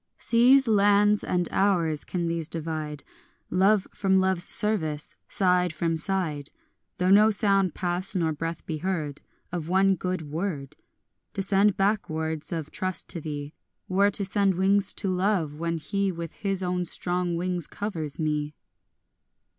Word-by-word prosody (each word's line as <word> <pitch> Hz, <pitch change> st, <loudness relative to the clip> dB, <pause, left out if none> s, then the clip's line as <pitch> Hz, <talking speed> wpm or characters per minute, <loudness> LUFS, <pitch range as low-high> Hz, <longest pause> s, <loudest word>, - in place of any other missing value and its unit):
5 -, -, -16 dB
Seas, 250 Hz, +3 st, +5 dB
lands, 205 Hz, 0 st, +4 dB
and 175 Hz, -1 st, 0 dB
hours, 170 Hz, -6 st, +1 dB
can 175 Hz, -2 st, -3 dB
these 165 Hz, -2 st, -2 dB
divide 155 Hz, -3 st, -4 dB, 0.5 s
Love 195 Hz, +2 st, +3 dB
from 190 Hz, -1 st, +2 dB
love's 190 Hz, -2 st, +1 dB
service, 160 Hz, -9 st, -1 dB
side 180 Hz, -2 st, +2 dB
from 165 Hz, +1 st, -1 dB
side, 160 Hz, -4 st, -2 dB, 0.5 s
Though 180 Hz, 0 st, +2 dB
no 210 Hz, +2 st, +7 dB
sound 195 Hz, -4 st, +2 dB
pass 180 Hz, +2 st, -1 dB
nor 165 Hz, -3 st, +1 dB
breath 165 Hz, +2 st, -5 dB
be 155 Hz, -2 st, -4 dB
heard 155 Hz, -5 st, -3 dB, 0.3 s
Of 170 Hz, -2 st, -4 dB
one 190 Hz, +1 st, +4 dB
good 185 Hz, -2 st, -3 dB
word? 155 Hz, -5 st, -4 dB, 0.6 s
To 195 Hz, -, -1 dB
send 200 Hz, +1 st, +3 dB
back 200 Hz, +2 st, +1 dB
words 160 Hz, 0 st, -3 dB
of 160 Hz, -3 st, -4 dB
trust 185 Hz, -1 st, -2 dB
to 170 Hz, -, -5 dB
thee 145 Hz, -1 st, -6 dB, 0.3 s
Were 200 Hz, +2 st, +3 dB
to 200 Hz, 0 st, -1 dB
send 195 Hz, -1 st, +1 dB
wings 195 Hz, +2 st, +3 dB
to 200 Hz, -, -3 dB
love, 180 Hz, -5 st, 0 dB
when 165 Hz, 0 st, -1 dB
he 195 Hz, +4 st, -1 dB
With 170 Hz, -2 st, -6 dB
his 195 Hz, -2 st, -1 dB
own 180 Hz, 0 st, -1 dB
strong 175 Hz, 0 st, -1 dB
wings 180 Hz, -1 st, -2 dB
covers 165 Hz, -9 st, -5 dB
me. 150 Hz, -1 st, -1 dB
180 Hz, 155 wpm, -26 LUFS, 160-195 Hz, 0.6 s, no